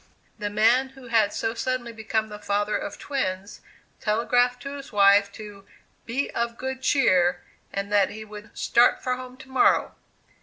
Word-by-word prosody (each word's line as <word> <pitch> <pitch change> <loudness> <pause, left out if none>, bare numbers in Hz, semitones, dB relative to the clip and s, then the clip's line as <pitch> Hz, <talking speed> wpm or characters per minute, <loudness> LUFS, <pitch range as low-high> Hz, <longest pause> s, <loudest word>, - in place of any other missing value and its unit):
"The 205 - -2
man 230 +6 +3
who 260 -2 -14
had 220 -3 +3
so 225 - -2
suddenly 245 0 -3
become 220 0 -2
the 210 0 -8
father 205 +1 -1
of - - -4
twins, 200 -8 -4 0.4
telegraphed 245 +3 +1
to 280 +1 -6
his 275 - -10
wife 200 -1 +5
to 205 -2 -11 0.4
'be 260 +5 -2
of 235 0 -2
good 265 0 -5
cheer,' 180 -10 +3 0.3
and 200 +1 -4
that 200 -2 +4
he 215 0 -8
would 210 0 -12
'start 240 +1 +3
for 255 0 0
home 255 0 -10
to 260 - -13
morrow. 260 -1 +3
225 Hz, 165 wpm, -25 LUFS, 205-255 Hz, 0.4 s, wife